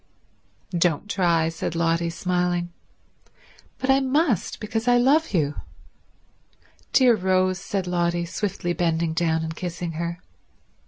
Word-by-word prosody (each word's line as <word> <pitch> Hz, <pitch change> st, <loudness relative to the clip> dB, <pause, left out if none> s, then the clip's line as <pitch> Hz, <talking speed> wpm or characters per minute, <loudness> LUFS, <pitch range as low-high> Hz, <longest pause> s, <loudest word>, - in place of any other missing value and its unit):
"Don't 170 Hz, +2 st, +1 dB
try," 170 Hz, -5 st, +2 dB
said 165 Hz, 0 st, -4 dB
Lotty, 165 Hz, 0 st, +1 dB
smiling. 175 Hz, 0 st, -1 dB, 1.0 s
"But 260 Hz, +1 st, +1 dB
I 270 Hz, -, +5 dB
must, 270 Hz, -, 0 dB
because 225 Hz, +2 st, -3 dB
I 245 Hz, 0 st, +5 dB
love 285 Hz, +6 st, +3 dB
you." 150 Hz, -6 st, +1 dB, 1.4 s
"Dear 250 Hz, -3 st, +5 dB
Rose," 185 Hz, -1 st, +1 dB
said 195 Hz, 0 st, -3 dB
Lotty, 175 Hz, -1 st, 0 dB
swiftly 185 Hz, -1 st, -3 dB
bending 165 Hz, -1 st, 0 dB
down 160 Hz, -1 st, +1 dB
and 160 Hz, 0 st, -4 dB
kissing 175 Hz, -1 st, -4 dB
her. 170 Hz, +2 st, -4 dB
175 Hz, 120 wpm, -24 LUFS, 170-205 Hz, 1.4 s, I